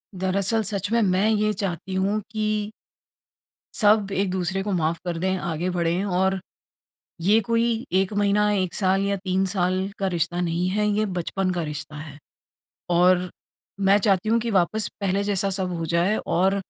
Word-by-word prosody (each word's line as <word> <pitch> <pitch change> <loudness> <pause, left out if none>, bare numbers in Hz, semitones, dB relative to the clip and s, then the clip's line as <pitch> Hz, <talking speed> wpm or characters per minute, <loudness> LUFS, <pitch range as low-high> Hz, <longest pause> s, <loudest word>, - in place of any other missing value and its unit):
दरअसल 195 +4 0
सच 200 0 -3
में 230 0 +3
मैं 195 +1 +2
ये 215 -1 +2
चाहती 190 -1 -4
हूँ 200 +3 0
कि 215 -1 -1 1.0
सब 205 -2 +3
एक-दूसरे 190 -1 -1
को 205 - -3
माफ़ 165 -2 0
कर 170 -1 -2
दें, 190 +2 0
आगे 175 0 -2
बढ़ें 175 +1 0
और 190 0 +1 0.8
ये 200 +6 +4
कोई 230 +1 0
1 195 +2 -1
महीना, 205 +1 +2
1 185 -3 -1
साल 195 0 +2
या 200 0 0
3 190 0 -1
साल 185 -2 +1 0.2
का 195 - 0
रिश्ता 175 +1 -1
नहीं 175 +1 0
है 210 +2 +1
ये 210 +1 +1
बचपन 185 +2 -1
का 175 -2 -2
रिश्ता 150 0 -6
है 145 -1 -9 0.8
और 180 0 +4 0.6
मैं 200 - +7
चाहती 200 0 +1
हूँ 230 - +3
कि 230 0 -3
वापस 200 +3 +1
पहले 195 +1 0
जैसा 200 -1 0
सब 185 -1 -2
हो 165 - -3
जाए 175 +5 +2
और 190 +3 +2
190 Hz, 170 wpm, -24 LUFS, 180-205 Hz, 1.0 s, मैं